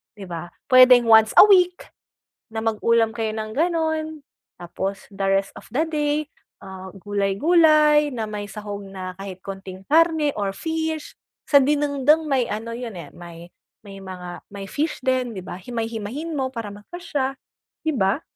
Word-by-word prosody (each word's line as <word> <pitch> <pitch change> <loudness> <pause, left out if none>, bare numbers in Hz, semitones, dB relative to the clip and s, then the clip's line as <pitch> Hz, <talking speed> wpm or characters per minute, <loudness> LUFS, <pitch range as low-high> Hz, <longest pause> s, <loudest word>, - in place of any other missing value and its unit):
'di 205 - -10
ba? 170 -1 -6 0.2
Puwedeng 255 -1 +8
once 220 -1 +6
a - - +11
week 360 -2 +3 0.6
na 220 0 -4
mag-ulam 225 0 +2
kayo 225 -2 -2
ng 215 0 -4
gano'n. 320 0 0 0.6
Tapos 190 +3 -5
the 195 -1 -4
rest 195 0 +1
of - - -12
the 300 - +2
day, 300 0 -1 0.3
ah, 190 -1 -9
gulay-gulay 295 - +3
na 220 -3 -4
may 210 -1 -5
sahog 205 -1 -7
na 185 -1 -8
kahit 195 -1 -8
kaunting 195 -1 -8
karne 320 -1 +4
or 200 -1 -2
fish. 320 +3 -4 0.3
Sa 285 - +7
dinengdeng 295 +2 +2
may 260 -3 +2
ano 220 +2 -4
'yon, 235 -3 -6
eh, 160 -4 -9
may 170 0 -11 0.4
may 195 -1 -10
mga 180 -2 -9
may 200 -1 -6
fish 300 -1 -2
din, 255 -2 0
'di 190 - -6
ba. - - -7
Himay-himayin 230 - -5
mo 260 -1 -1
para 230 -4 -5
magkasya, 270 - -4 0.5
'di 315 -1 0
ba? 195 +7 +1
225 Hz, 155 wpm, -22 LUFS, 195-295 Hz, 0.6 s, a